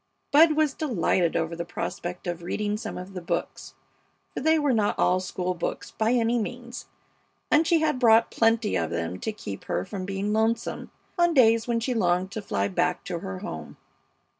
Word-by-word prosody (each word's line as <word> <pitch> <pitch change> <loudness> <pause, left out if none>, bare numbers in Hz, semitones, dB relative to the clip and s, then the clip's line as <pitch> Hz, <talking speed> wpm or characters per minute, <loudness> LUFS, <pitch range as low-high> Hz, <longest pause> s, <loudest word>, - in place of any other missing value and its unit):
Bud 310 +2 +7
was 305 -2 +2
delighted 185 - 0
over 165 +1 -1
the 170 - -3
prospect 175 +1 -5
of 175 -1 -3
reading 205 +4 -2
some 215 - -5
of 185 +2 -8
the 180 - -5
books, 170 - -4 0.6
for - - -3
they 320 +3 +4
were 290 -4 +2
not 210 -3 +1
all 180 +1 +3
school 185 0 -3
books, 170 - -4
by 220 +2 +1
any 235 0 +2
means, 240 +2 -6 0.6
and 310 +2 +4
she 330 -2 +3
had 300 -5 +1
brought 230 -2 +5
plenty 225 -1 +2
of 80 -1 0
them 85 +2 -3
to 220 - -2
keep 100 - -8
her 90 +2 -2
from 190 -2 -5
being 195 +2 -2
lonesome 225 +1 -1 0.3
on 345 -1 +3
days 230 -3 +5
when 235 -1 +1
she 250 +2 -1
longed 185 -3 +1
to 220 +1 -4
fly 200 - -1
back 180 -2 0
to 175 -2 -4
her 95 - -6
home. - - -7
215 Hz, 190 wpm, -26 LUFS, 180-240 Hz, 0.6 s, Bud